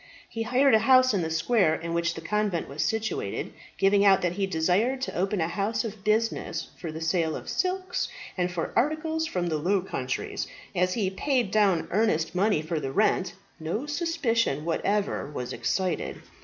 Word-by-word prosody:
He 225 - -5
hired 255 +4 +3
a 220 - +7
house 255 +2 +5
in 195 - +1
the 160 - -2
square 165 +1 +2
in 165 +1 -5
which 170 0 0
the 165 - -6
convent 205 0 -1
was 140 +3 -4
situated, 220 +6 -2 0.2
giving 200 +1 +4
out 195 -2 +5
that 175 - +2
he 195 +2 -1
desired 190 +10 +1
to 260 - -3
open 190 +3 0
a 160 - +1
house 205 +5 -1
of 215 -3 -7
business 220 +1 0
for 165 - -5
the 160 - -6
sale 160 -1 +1
of - - -8
silks, 370 0 -1 0.3
and 180 -1 0
for 175 -2 -3
articles 315 +3 +1
from 180 - -2
the 160 -3 -1
Low 190 +6 +2
Countries. 130 -8 -3 0.3
As 180 +1 +1
he 200 -5 0
paid 245 0 0
down 195 -6 +3
earnest 180 -6 +1
money 190 -3 +2
for 155 0 -2
the 135 -2 -4
rent, 190 +2 +1 0.2
no 170 - -3
suspicion 280 - 0
whatever 200 0 0
was 125 -4 -5
excited. 180 +10 -1
195 Hz, 185 wpm, -27 LUFS, 165-225 Hz, 0.3 s, a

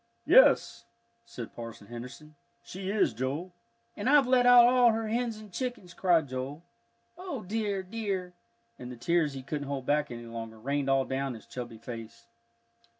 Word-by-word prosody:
"Yes," - - +5 0.4
said 120 - -8
Parson 115 -3 -8
Henderson, 125 +7 -10 0.3
"she 190 +1 -6
is, 200 - +2
Joel." 140 +10 -3 0.4
"And - - -1
I've 290 -1 +6
let 250 -1 +4
out 245 -1 +9
all 245 -1 +5
her 225 0 -2
hens 235 -1 -1
and 215 -3 -13
chickens!" 245 -8 -4
cried 170 -6 +2
Joel. 130 +5 -5 0.6
"O 350 - -5
dear, 205 -1 -2
dear!" 190 -3 -4 0.5
and 125 0 -7
the 125 - -9
tears 160 +3 +1
he 135 -1 -7
couldn't 145 +1 -4
hold 135 -2 -4
back 150 +1 +1
any 120 0 -8
longer 115 -1 -7
rained 140 +4 -2
all 135 -1 +3
down 135 -1 -2
his 110 - -12
chubby 120 -2 -7
face. 115 -1 -9
150 Hz, 165 wpm, -29 LUFS, -, 0.6 s, out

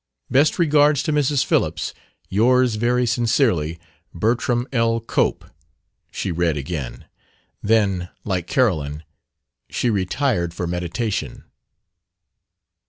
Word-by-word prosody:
"Best 145 +4 +3
regards 150 -3 +4
to 155 - -1
Mrs. 145 -2 +2
Phillips. - - 0 0.3
Yours 125 +4 +3
very 120 +3 +1
sincerely, 115 - +1 0.4
Bertram 120 +5 0
L. 115 -1 +2
Cope," 115 - -1 0.7
she - - -3
read 85 -2 0
again; 70 -5 -5 0.6
then, 100 -5 +1
like 90 -4 -2
Carolyn, 80 - 0 0.7
she 120 - 0
retired 95 - 0
for 90 - -3
meditation. 90 - -3
110 Hz, 100 wpm, -21 LUFS, 85-125 Hz, 0.7 s, regards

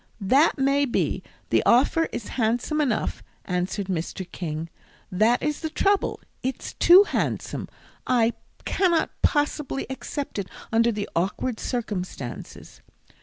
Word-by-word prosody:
"That 265 - +4
may 275 +1 +3
be; 245 - 0 0.3
the - - +4
offer 285 +7 +4
is 210 - -5
handsome 245 +6 0
enough," 255 -7 -1 0.2
answered 180 +2 -1
Mr. 185 0 -3
King, 160 -2 -4 0.4
"that 215 +6 +3
is 300 -1 -1
the 320 - -3
trouble, 395 +5 +1 0.2
it's 260 0 -4
too 360 +4 +8
handsome. - - -2 0.4
I 235 -2 +3 0.3
cannot 350 -4 +2
possibly 290 -1 0
accept 275 -2 -4
it 195 - -4 0.2
under 230 +1 +4
the 210 -2 -3
awkward 200 +7 -1
circumstances. 185 - -5
240 Hz, 120 wpm, -25 LUFS, 195-290 Hz, 0.4 s, too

